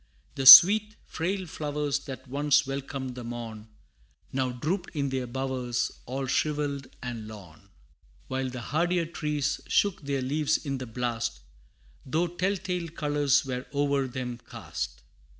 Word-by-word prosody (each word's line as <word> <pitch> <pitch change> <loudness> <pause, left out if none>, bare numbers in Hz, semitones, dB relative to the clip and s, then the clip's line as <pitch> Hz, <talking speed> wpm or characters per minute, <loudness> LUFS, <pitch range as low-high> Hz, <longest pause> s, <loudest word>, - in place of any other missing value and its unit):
The 135 -1 -1
sweet, 210 +9 +10
frail 185 +3 -3
flowers 150 -3 -2
that 135 -1 -8
once 145 +2 +2
welcomed 135 -1 -5
the 125 0 -8
morn, 115 -2 -7 0.7
Now 130 -1 0
drooped 170 +9 -3
in 140 -2 -1
their 130 -1 -3
bowers, 125 -1 -2 0.2
all 135 +2 -3
shrivelled 145 0 -1 0.2
and 120 -3 -6
lorn; 100 -4 -13 0.6
While 130 0 -2
the 125 -1 -7
hardier 170 +7 0
trees 150 -3 -2
shook 195 -3 +1
their 140 -2 -2
leaves 150 +3 +1
in 135 -2 -3
the 130 - -6
blast 115 - -3 0.6
Though 160 +6 0
tell 180 +3 -1
tale 180 -2 -4
colors 145 -3 +1
were 125 -1 -4
over 140 -1 +1
them 125 -1 -5
cast. 60 -2 -6
135 Hz, 140 wpm, -27 LUFS, 125-150 Hz, 0.7 s, sweet